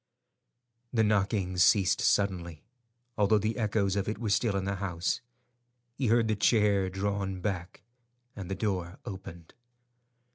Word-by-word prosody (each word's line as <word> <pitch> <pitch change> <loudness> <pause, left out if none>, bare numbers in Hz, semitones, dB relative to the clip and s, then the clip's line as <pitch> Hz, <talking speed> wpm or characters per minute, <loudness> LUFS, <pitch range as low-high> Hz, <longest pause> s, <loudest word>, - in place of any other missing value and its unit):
The 110 -3 +2
knocking 100 -3 0
ceased 95 +2 +4
suddenly, 85 -6 0 0.6
although 105 +1 +4
the 110 +2 -1
echoes 100 -3 +1
of 100 0 -1
it 110 - -3
were 110 -2 -2
still 100 0 +2
in 95 - -2
the 100 0 -2
house. 90 -2 -2 0.7
He 130 0 -2
heard 115 0 +3
the 110 - +1
chair 100 -3 +3
drawn 95 0 -2
back, 90 -2 -4 0.5
and 95 -2 -7
the 95 - -2
door 95 -4 -2
opened. 85 -4 -9
100 Hz, 140 wpm, -29 LUFS, 95-105 Hz, 0.7 s, ceased